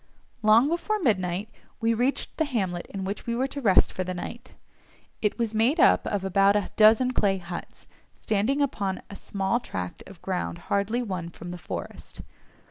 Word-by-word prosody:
Long 220 +4 +6
before 345 +7 -1
midnight 195 - 0 0.3
we 230 0 +2
reached 250 +5 -1
the 315 - +2
hamlet 190 -10 -2
in 195 -1 -5
which 200 +4 -5
we 235 - 0
were 255 +2 +1
to 280 +1 -5
rest 195 -6 +4
for 185 - -2
the 185 0 -4
night; 240 +7 -7 0.7
it 210 - 0
was 230 -2 -1
made 235 +9 +2
up - - +5
of 200 -2 -1
about 195 +1 +4
a 205 -2 0
dozen 225 +4 +6
clay 195 -4 +2
huts, 175 -1 -8 0.3
standing 225 +8 +1
upon 200 -8 -2
a - - -7
small 195 +4 -1
tract 90 - -6
of 195 -3 -13
ground 180 -2 -2 0.2
hardly 210 +5 +1
won 185 -6 -4
from 175 +1 -9
the 180 - -6
forest. - - -7
205 Hz, 180 wpm, -26 LUFS, 190-240 Hz, 0.7 s, Long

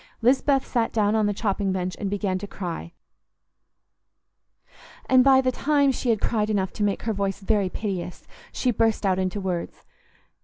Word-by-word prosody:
Lisbeth 270 +2 +3
sat 235 -3 0
down 210 -2 +1
on 215 -1 +2
the - - +1
chopping 200 -1 -1
bench 185 -1 -2
and 200 - -2
began 195 -2 -1
to 205 - -7
cry, 175 -4 -6 2.1
and 255 -1 +5
by 265 0 +6
the 255 -1 +1
time 285 +1 +2
she 255 -1 -3
had 225 -2 +2
cried 215 -1 0
enough 195 -3 -1
to 210 - -2
make 205 -1 -1
her 225 - -1
voice 195 -1 -2
very 200 -1 0
piteous, 180 -4 -5 0.3
she 255 - 0
burst 225 -1 +1
out 190 -1 +2
into 185 +2 -1
words. 180 -3 -4
205 Hz, 170 wpm, -24 LUFS, 190-235 Hz, 2.1 s, by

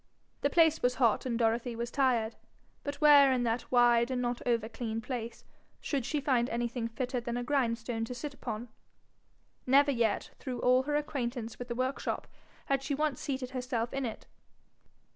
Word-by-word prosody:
The 285 - +2
place 320 0 +4
was 250 0 +2
hot, 240 0 +2
and 235 -2 -1
Dorothy 230 +1 0
was 235 +1 -4
tired. 240 -5 +1 0.5
But 285 0 -3
where 290 -2 +8
in 250 -2 +1
that 235 +1 -2
wide 240 -1 +5
and 255 -1 -1
not 245 -1 -2
over 230 -2 +1
clean 225 -1 -4
place 235 -1 -5 0.4
should 275 -5 -2
she 295 - 0
find 255 -4 +1
anything 235 0 -2
fitter 245 +2 -3
than 235 0 -3
a 245 - -2
grindstone 235 -3 0
to 250 - -6
sit 285 +3 -5
upon? 235 -3 -6 1.0
Never 280 +2 +5
yet, 230 -5 0
through 250 -3 -5
all 255 +1 +4
her 295 - +1
acquaintance 245 -6 -3
with 245 - -6
the 235 - -4
workshop, 255 +2 -2 0.4
had 275 -1 +1
she 280 +1 -2
once 300 -2 -1
seated 260 -2 -3
herself 250 -2 -2
in 275 -2 -1
it. 220 - -8
245 Hz, 180 wpm, -31 LUFS, 235-270 Hz, 1.0 s, where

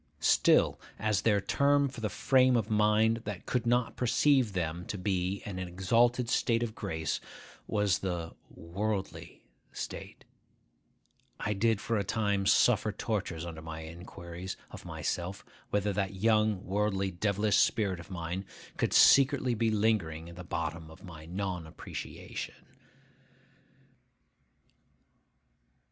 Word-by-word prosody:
Still, - - +4 0.2
as 105 -2 +1
their 105 -3 +3
term 140 +6 +2
for 130 -3 -8
the 110 - -1
frame 130 0 +3
of 110 -1 -2
mind 105 +1 +3
that 105 -4 -5
could 120 -2 -1
not 120 0 +1
perceive 125 -2 +3
them 85 -1 -2
to 105 - -4
be 95 0 -1
in 95 -3 -5
an 90 - -4
exalted 115 +7 +2
state 115 -1 +1
of 115 -2 -3
grace 80 -8 -3 0.5
was 105 -2 +1
the 85 -3 -3 0.2
'worldly' 100 +4 -4 0.3
state, - - -7 1.1
I 105 - -1
did 110 +1 +2
for 115 +1 -1
a - - 0
time 100 -2 0
suffer - - +4
tortures 80 0 -3
under 80 -2 -7
my 80 0 -7
inquiries 85 +2 -8
of - - -10
myself 90 +2 -4 0.2
whether 105 0 0
that 95 0 -2
young 105 -1 +2
worldly 100 -1 0
devilish 100 +3 +1
spirit 100 -6 +2
of 85 - -11
mine 90 +1 -4 0.3
could - - 0
secretly 135 -2 +6
be 115 0 +1
lingering 100 -7 0
at 85 - -11
the 90 - -8
bottom 80 -1 -4
of 80 +5 -14
my 80 -4 -10
non 90 -2 -3
appreciation. 80 - -7
100 Hz, 130 wpm, -30 LUFS, 90-110 Hz, 1.1 s, secretly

